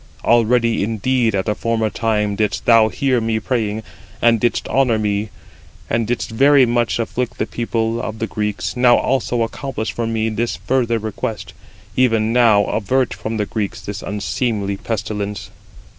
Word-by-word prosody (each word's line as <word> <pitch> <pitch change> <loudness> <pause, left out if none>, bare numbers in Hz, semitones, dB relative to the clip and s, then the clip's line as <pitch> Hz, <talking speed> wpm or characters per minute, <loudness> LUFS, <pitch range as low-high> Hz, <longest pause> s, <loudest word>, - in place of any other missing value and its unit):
already 115 -1 +3
indeed 115 +1 0
at 95 +1 -1
a 105 - +2
former 110 0 -1
time 105 -2 0
didst 105 -1 -1
thou 115 -2 +6
hear 130 0 0
me 110 0 0
praying, 110 -2 -2 0.4
and 115 -1 +4
didst 120 - 0
honour 130 -4 +2
me, 105 0 -1 0.6
and 115 -1 +1
didst 115 -1 -2
very 135 +3 +5
much 120 -1 +1
afflict 120 +1 -3
the - - 0
people 115 -1 -2
of 110 0 -5
the 115 - -2
Greeks, 105 -2 -3
now 125 -1 +5
also 125 -2 0
accomplish 115 -1 -4
for 115 -1 -3
me 110 -1 0
this 115 +2 -2
further 120 -3 0
request: 110 +1 -5 0.4
even 115 -3 +2
now 115 -4 +5
avert 120 +5 0
from 110 0 -4
the 105 - 0
Greeks 105 -1 -3
this 100 0 -6
unseemly 105 0 -2
pestilence." 105 -1 -4
115 Hz, 160 wpm, -19 LUFS, 105-120 Hz, 0.6 s, thou